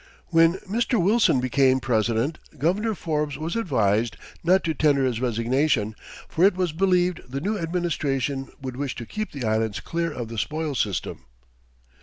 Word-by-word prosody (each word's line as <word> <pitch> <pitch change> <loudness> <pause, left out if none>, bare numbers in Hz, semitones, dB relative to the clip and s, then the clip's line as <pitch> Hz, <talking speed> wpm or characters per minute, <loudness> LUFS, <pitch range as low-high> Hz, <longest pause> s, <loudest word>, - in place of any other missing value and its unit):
When 165 -1 +5
Mr. 230 +3 +1
Wilson 200 - +4
became 130 +1 +3
president, 120 +3 0 0.2
Governor 200 - +1
Forbes 150 -5 -2
was 160 +5 -3
advised 115 - +1 0.3
not 185 +3 +4
to 160 - 0
tender 140 -2 +3
his 120 -2 -1
resignation, 120 -1 +1 0.3
for 165 - 0
it 195 -1 +6
was 180 -3 0
believed 180 0 +2
the 135 +2 -3
new 205 +9 -1
administration 145 - -1
would 130 -2 -6
wish 140 -2 -3
to 120 - -6
keep 215 - -4
the 135 -4 -5
Islands 110 -1 0
clear 170 0 -2
of 120 -5 -5
the 115 -1 -4
spoil 155 +4 -2
system. 100 - -2
145 Hz, 160 wpm, -24 LUFS, 125-175 Hz, 0.3 s, it